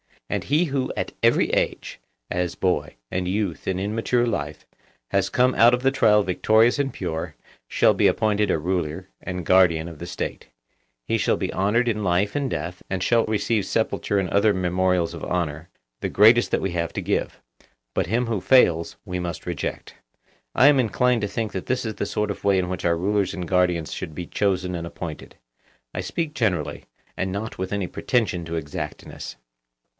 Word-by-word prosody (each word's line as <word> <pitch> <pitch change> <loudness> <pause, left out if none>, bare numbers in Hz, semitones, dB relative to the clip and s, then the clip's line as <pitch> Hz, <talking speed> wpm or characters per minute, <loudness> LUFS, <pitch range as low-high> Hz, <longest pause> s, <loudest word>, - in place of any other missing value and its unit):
And - - -1
he 155 +6 +2
who 135 -4 -1
at - - -3
every - - +3
age, - - -1 0.3
as 90 -1 -1
boy 75 -5 -1 0.2
and 90 0 -1
youth 95 -2 -2
and 95 -1 0
in 100 +2 -2
mature 120 +2 +1
life, 75 -10 -3 0.5
has 100 -1 +1
come 125 +1 +3
out 120 +2 +6
of 125 - -8
the 135 - +4
trial 105 -6 +4
victorious 110 +7 +3
and 135 -1 0
pure, 80 -3 -4 0.3
shall - - +4
be - - +3
appointed 105 -1 +1
a - - +2
ruler 90 +1 -2
and 90 -2 -5
guardian 85 -3 +4
of 80 -3 -11
the 85 - -6
State; - - -5 0.6
he - - +1
shall - - +2
be - - -3
honoured 105 +6 +1
in 110 -2 -1
life 95 +2 +1
and 140 -2 -1
death, 90 -5 -4
and 95 -1 -2
shall 115 +2 +3
receive 105 0 0
sepulture 100 - 0
and 95 -2 0
other 100 +3 +3
memorials 90 -1 +1
of - - -8
honour, 80 -2 -2 0.3
the - - -2
greatest 115 +4 +5
that - - 0
we 95 - -1
have 85 -1 -2
to - - -3
give. - - -2 0.5
But - - 0
him 120 +6 +1
who 110 -5 -1
fails, 85 -11 +4
we 90 -2 -3
must 90 0 -5
reject. 85 -4 -4 0.6
I 130 - +6
am 145 -2 +6
inclined 125 0 +2
to 105 - 0
think 110 +1 -3
that 95 - -5
this 130 -1 -1
is 110 -2 -3
the - - -3
sort 105 -1 -1
of 100 - -8
way 100 -1 +4
in 90 -1 0
which 90 - -4
our 85 -1 +2
rulers 100 +2 0
and 90 -2 -4
guardians 90 -3 +1
should 80 - -6
be 90 - -5
chosen 90 -1 0
and 85 -1 -4
appointed. 85 -2 -8 0.6
I - - -4
speak 165 -3 -3
generally, 95 - -1 0.3
and 95 - -1
not 105 +4 -4
with 95 +2 -3
any 100 -2 -1
pretension 100 -6 -1
to 80 +1 -4
exactness. 75 -5 -6
95 Hz, 195 wpm, -24 LUFS, 90-110 Hz, 0.6 s, out